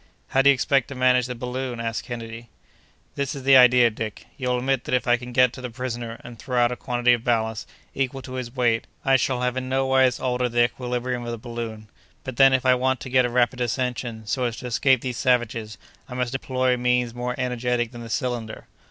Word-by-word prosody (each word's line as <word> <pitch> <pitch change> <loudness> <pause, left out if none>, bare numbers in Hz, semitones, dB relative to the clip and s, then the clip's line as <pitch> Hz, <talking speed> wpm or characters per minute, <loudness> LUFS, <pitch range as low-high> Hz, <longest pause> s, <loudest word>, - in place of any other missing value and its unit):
"How 135 - +3
do 140 - +5
you - - +8
expect 135 +1 +1
to 140 - -8
manage 125 -1 +3
the 125 - -5
balloon?" 125 0 -4
asked 115 -1 -3
Kennedy. 115 -1 -7 0.6
"This 140 -1 -3
is 135 - -7
the 135 0 +6
idea, 125 -2 +7
Dick: 110 -1 -6
you 125 -1 -3
will 125 - +1
admit 130 0 -1
that - - 0
if 125 - -1
I 120 - +5
can 125 0 -8
get 125 0 +4
to 130 - -9
the 125 - -5
prisoner, 120 -1 -5
and 120 -1 -11
throw 125 -2 -3
out 120 0 +3
a - - -2
quantity 125 0 +1
of 120 -2 -1
ballast, 110 -2 -1 0.2
equal 135 0 -2
to 130 - -9
his 125 -1 -5
weight, 120 -3 +1 0.2
I 135 0 +5
shall 130 -1 +1
have 125 0 -1
in 130 0 -3
nowise 130 -1 +2
altered 125 -1 -1
the 120 0 +4
equilibrium 125 0 -2
of 120 - -5
the 115 - -4
balloon. 115 -2 -7 0.4
But, 130 -4 -7
then, 135 0 +7
if 130 0 +1
I 130 - +6
want 130 0 +1
to 130 - -6
get 130 -1 +4
a - - -1
rapid 125 +1 +1
ascension, 120 -2 -2
so 125 +4 -1
as 115 -1 -3
to - - -8
escape 125 +1 +2
these 125 -3 -4
savages, 115 -4 0 0.3
I 125 - -7
must 125 0 -2
employ 130 -1 0
means 125 -1 +1
more 125 0 -3
energetic 125 -2 -1
than 120 -1 -9
the 115 - -8
cylinder. 115 0 -3
125 Hz, 230 wpm, -24 LUFS, 120-130 Hz, 0.6 s, you